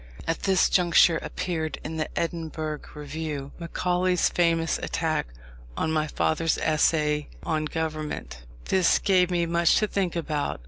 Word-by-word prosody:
At 165 - -2
this 190 -2 +3
juncture 170 -2 +4
appeared 160 -3 -3
in 160 +1 -5
the 155 - -2
Edinburgh 160 -2 -3 0.2
Review, 150 -1 -5
Macaulay's 180 +1 +1
famous 165 -2 +1
attack 160 - -1 0.5
on 160 - 0
my 155 -1 +1
father's 160 +2 0
Essay 150 -1 +1
on 155 -1 -1
Government. 155 - -4 0.2
This 185 -2 +3
gave 185 -2 +3
me 175 -1 +1
much 170 0 +3
to 215 - +3
think 195 -4 -1
about. 155 - -2
160 Hz, 135 wpm, -26 LUFS, 155-170 Hz, 0.5 s, juncture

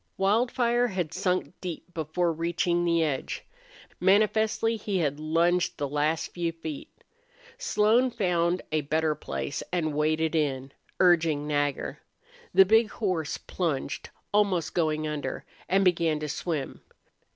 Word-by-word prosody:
Wildfire 240 +4 +2
had 180 -7 -3
sunk 185 0 -1
deep 175 0 -6
before 165 +2 0
reaching 170 +1 0
the 170 -1 +2
edge. 145 -4 -3 0.5
Manifestly 215 +3 +3
he 205 -2 -2
had 145 -4 0
lunged 170 +3 +1
the 145 - -2
last 150 +3 0
few 170 -1 -1
feet. 160 -3 -7 0.7
Slone 245 - +3
found 180 -6 0
a 155 0 +1
better 155 +2 +1
place, 145 -1 -4
and 160 -4 0
waded 155 +2 +1
in, 135 -4 -1 0.3
urging 165 -5 +3
Nagger. 145 -1 -1 0.5
The 190 - +7
big 220 +3 +4
horse 180 -8 -2
plunged, 155 -6 -3 0.2
almost 195 -6 +2
going 155 -2 0
under, 150 -1 -4 0.2
and 195 +1 +3
began 170 -4 +2
to 150 - -3
swim. 150 -2 -3
170 Hz, 130 wpm, -27 LUFS, 155-190 Hz, 0.7 s, The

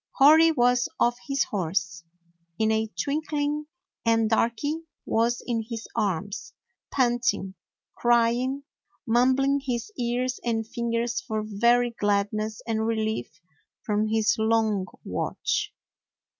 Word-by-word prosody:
Hori 315 +4 +7
was 245 -3 +2
off 240 +1 +2
his 275 0 +2
horse 170 -3 -2 0.5
in 220 0 +2
a 220 0 +1
twinkling, 295 - -1 0.4
and 225 -1 +3
Darky 235 +7 +1 0.3
was 235 +2 +1
in 235 -2 -1
his 225 0 -6
arms, 200 -3 -2 0.4
panting, 240 -7 +1 0.4
crying, 240 +3 +2 0.4
mum 245 +2 +4
bling 275 +1 +2
his 255 - -3
ears 245 +1 -1
and 225 -2 -1
fingers 235 +1 -1
for 215 -3 -3
very 235 +3 +3
gladness 210 0 -1
and 220 -1 -1
relief 220 - -2 0.4
from 210 0 0
his 220 -1 +2
long 220 -3 +1 0.2
watch. - - -2
230 Hz, 115 wpm, -26 LUFS, 220-250 Hz, 0.5 s, Hori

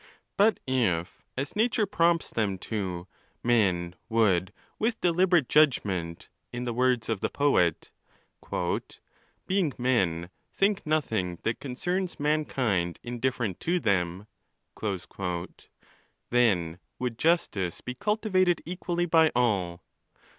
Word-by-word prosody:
But 210 +2 +4
if, 110 -10 0 0.2
as 135 +2 -3
nature 220 0 +2
prompts 170 -3 +1
them 105 -4 0
to, 90 -4 -4 0.4
men 95 -8 +2 0.2
would 100 -5 +2 0.3
with 225 +1 0
deli 180 +2 +3
berate 175 -8 +3
judgment, 95 - +2 0.2
in 120 +1 -4
the 120 - -2
words 125 -1 +1
of 110 -4 -1
the - - 0
poet, 115 - +1 1.5
"being 185 -7 +1
men, 95 -9 +1 0.2
think 200 -2 +1
nothing 110 - 0
that 115 - -1
concerns 180 +8 -3
mankind 130 - 0
indifferent 120 -4 -2
to 180 +2 0
them," 95 - 0 2.1
then 90 -9 +2 0.2
would 125 -2 -3
justice 105 - +1
be 125 - -5
cultivated 185 - +1
equally 175 0 -2
by 160 -1 +5
all. 95 -8 +1
125 Hz, 110 wpm, -28 LUFS, -, 2.1 s, by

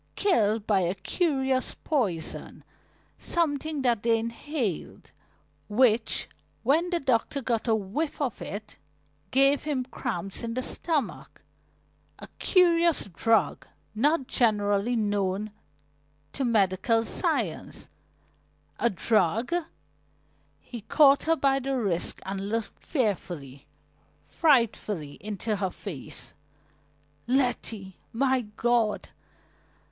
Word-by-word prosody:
Killed 220 - +2
by 205 -3 +3
a 180 +1 0
curious 265 - 0
poison, 205 - -2 0.6
something 310 -3 -1
that 235 -4 +2
they 230 0 +3
inhaled, 230 - -4 0.6
which, 225 0 +3 0.4
when 315 +8 +3
the 350 -1 0
doctor 265 0 +1
got 240 -3 -1
a 225 - +4
whiff 220 +10 -3
of 270 -7 -2
it, 205 -5 -7 0.5
gave 275 +3 +4
him 285 -4 -2
cramps 190 -6 -4
in 230 -1 -4
the 255 - -1
stomach 300 -5 -3 0.7
a - - -10
curious 340 -3 +4
drug 225 +6 +1 0.3
not 280 +6 +2
generally 210 -1 +2
known 205 -1 0 0.8
to 275 - -2
medical 225 0 +2
science, - - -2 0.9
a 235 - +3
drug 215 - +1 0.6
" - - -39 0.3
He 240 -3 -9
caught 280 +5 +5
her 325 0 +3
by 275 -3 +2
the 270 0 -2
wrist 190 -8 -1
and 195 +1 -4
looked 225 0 -4
fearfully, 175 - -2 0.6
frightfully, 215 - +1
into 210 +1 -3
her 190 -1 -1
face. 135 - -8 0.9
"Letty! 235 -7 -1
My 260 -1 +1
God!" 235 -3 +1
230 Hz, 105 wpm, -27 LUFS, 205-275 Hz, 0.9 s, caught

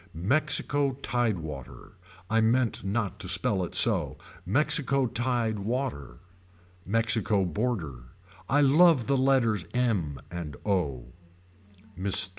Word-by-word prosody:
Mexico 140 - +1
tide 120 -5 0
water. 70 -6 -9 0.4
I 110 +2 +1
meant 115 +1 +1
not 100 0 -3
to 95 - -6
spell 95 +2 +1
it 90 - -6
so. - - +4 0.3
Mexico 140 +3 +2
tied 120 -2 -2
water. 100 - -4 0.7
Mexico 110 -2 +2
border. 85 - -3 0.4
I 145 +2 +3
love 145 -2 +4
the 140 - +1
letters 130 -7 +1
m 100 - -1
and 85 -4 -6
o. 70 - -2 0.8
Mr. 95 0 +2
110 Hz, 110 wpm, -27 LUFS, 90-125 Hz, 0.8 s, so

